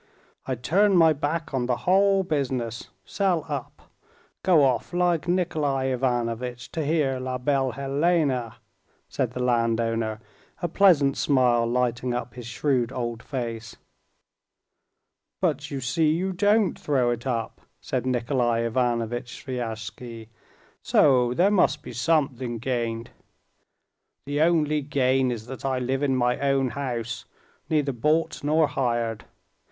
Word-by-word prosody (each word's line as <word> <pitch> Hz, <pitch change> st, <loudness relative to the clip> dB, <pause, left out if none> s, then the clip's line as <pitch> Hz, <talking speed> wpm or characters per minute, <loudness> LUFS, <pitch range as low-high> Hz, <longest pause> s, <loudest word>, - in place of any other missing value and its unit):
I'd 125 Hz, -2 st, -4 dB
turn 195 Hz, -, +3 dB
my 165 Hz, -2 st, +6 dB
back 150 Hz, +2 st, -3 dB
on 125 Hz, -2 st, 0 dB
the 125 Hz, -1 st, +1 dB
whole 195 Hz, +1 st, +4 dB
business, 130 Hz, -8 st, -2 dB, 0.2 s
sell 180 Hz, -6 st, 0 dB
up, 145 Hz, -5 st, -6 dB, 0.6 s
go 175 Hz, -6 st, +4 dB
off 130 Hz, +3 st, 0 dB
like 175 Hz, -2 st, +1 dB
Nikolay 155 Hz, -7 st, 0 dB
Ivanovitch... 120 Hz, -1 st, -2 dB
to 160 Hz, -, -2 dB
hear 145 Hz, -4 st, +1 dB
La 130 Hz, 0 st, -3 dB
Belle 135 Hz, 0 st, 0 dB
Hélène," 140 Hz, -3 st, 0 dB, 0.5 s
said -, -, -2 dB
the -, -, -5 dB
landowner, 115 Hz, -2 st, 0 dB, 0.4 s
a 175 Hz, -, -1 dB
pleasant 155 Hz, -7 st, +4 dB
smile 125 Hz, -4 st, +3 dB
lighting 125 Hz, 0 st, 0 dB
up 125 Hz, 0 st, -4 dB
his 120 Hz, -2 st, -9 dB
shrewd 125 Hz, -1 st, 0 dB
old 120 Hz, -3 st, -4 dB
face. 115 Hz, -4 st, -5 dB, 1.6 s
"But 150 Hz, -5 st, -1 dB
you 140 Hz, -3 st, -4 dB
see 150 Hz, +5 st, +1 dB
you 180 Hz, +5 st, 0 dB
don't 205 Hz, +1 st, +2 dB
throw 130 Hz, -5 st, +1 dB
it 120 Hz, +2 st, -4 dB
up," 115 Hz, -3 st, -3 dB, 0.2 s
said -, -, -3 dB
Nikolay 120 Hz, -2 st, +1 dB
Ivanovitch 120 Hz, +1 st, -2 dB
Sviazhsky; 115 Hz, -2 st, -6 dB, 0.5 s
"so 125 Hz, -3 st, +3 dB
there 190 Hz, +7 st, +4 dB
must 205 Hz, -, +2 dB
be -, -, -8 dB
something 130 Hz, -3 st, 0 dB
gained." 115 Hz, -1 st, -3 dB, 1.1 s
"The 145 Hz, +2 st, -1 dB
only 155 Hz, -2 st, +2 dB
gain 130 Hz, -2 st, +1 dB
is 115 Hz, -3 st, -4 dB
that 130 Hz, -1 st, -8 dB
I 135 Hz, -1 st, 0 dB
live 130 Hz, +2 st, -1 dB
in 140 Hz, -2 st, +1 dB
my 125 Hz, -1 st, +1 dB
own 135 Hz, -1 st, +1 dB
house, 120 Hz, -4 st, -4 dB, 0.4 s
neither 150 Hz, -3 st, +1 dB
bought 150 Hz, +8 st, 0 dB
nor 155 Hz, +2 st, +3 dB
hired. 120 Hz, -5 st, -1 dB
130 Hz, 130 wpm, -25 LUFS, 120-150 Hz, 1.6 s, my